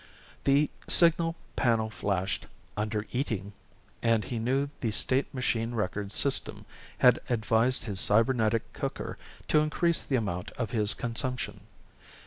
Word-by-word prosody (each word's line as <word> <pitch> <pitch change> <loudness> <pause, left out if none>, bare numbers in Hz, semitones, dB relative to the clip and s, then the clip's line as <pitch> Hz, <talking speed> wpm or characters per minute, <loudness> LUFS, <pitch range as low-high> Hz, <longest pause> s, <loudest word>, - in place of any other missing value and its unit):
The 140 +2 +3 0.2
signal 165 -1 +4 0.2
panel 115 -3 +1
flashed 95 -4 -2 0.3
"Under 105 0 -2
Eating" 110 -6 -3 0.5
and 115 -2 +2
he 115 +4 -4
knew 135 +5 0
the 115 - -1
state 130 +5 +1
machine 120 -3 -1
records 105 -1 -3
system 140 - -1 0.3
had - - +5
advised 115 +1 +2
his 100 -4 -2
cybernetic 115 +1 +3
cooker - - -5 0.3
to 150 - +5
increase 165 +3 +1
the 135 - -1
amount 100 -7 -2
of 115 -4 -3
his 105 -2 +1
consumption. 125 +2 -3
115 Hz, 125 wpm, -29 LUFS, 105-130 Hz, 0.5 s, had